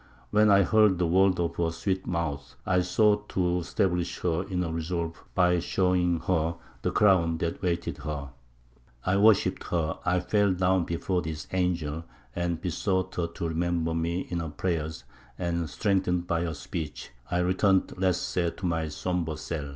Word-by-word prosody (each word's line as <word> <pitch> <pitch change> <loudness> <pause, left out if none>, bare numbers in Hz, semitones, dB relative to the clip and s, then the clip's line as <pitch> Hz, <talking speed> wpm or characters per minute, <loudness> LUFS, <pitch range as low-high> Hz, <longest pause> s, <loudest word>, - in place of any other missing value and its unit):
When 105 0 +5
I 100 0 +6
heard 105 -3 +4
the 90 - +1
words 95 +2 +3
of 85 -1 -1
her 85 -1 +1
sweet 95 +3 -2
mouth, 85 -5 -3
I 90 0 +3
sought 105 +3 +2
to 90 -1 +1
stablish 90 -1 -1
her 85 -2 +1
in 90 -1 0
her 85 - -3
resolve 85 0 -3
by 90 -1 +4
showing 90 -1 +1
her 85 -2 0 0.3
the - - 0
crown 85 -5 +3
that 85 0 -2
awaited 85 -2 -2
her. 75 -2 -5 0.8
I 95 +1 +2
worshipped 105 0 +4
her; 80 -2 -1
I 90 0 +2
fell 100 +1 +2
down 90 -1 +2
before 90 +2 -1
this 80 -1 -5
angel, 85 -4 -1 0.3
and 85 -1 -1
besought 95 +1 -1
her 85 -1 -1
to 85 0 -4
remember 85 0 0
me 85 +2 -1
in 85 -2 -4
her 80 -1 -3
prayers; 80 -3 -3 0.3
and 85 -2 -2
strengthened 95 -4 0
by 85 0 0
her 80 -2 -3
speech, 75 +1 -6 0.2
I 90 - 0
returned 95 +2 +2
less 95 -2 +2
sad 85 -2 -1
to 95 - -5
my 80 -2 0
sombre 80 0 -2
cell." 75 -2 -4
85 Hz, 170 wpm, -27 LUFS, 85-95 Hz, 0.8 s, I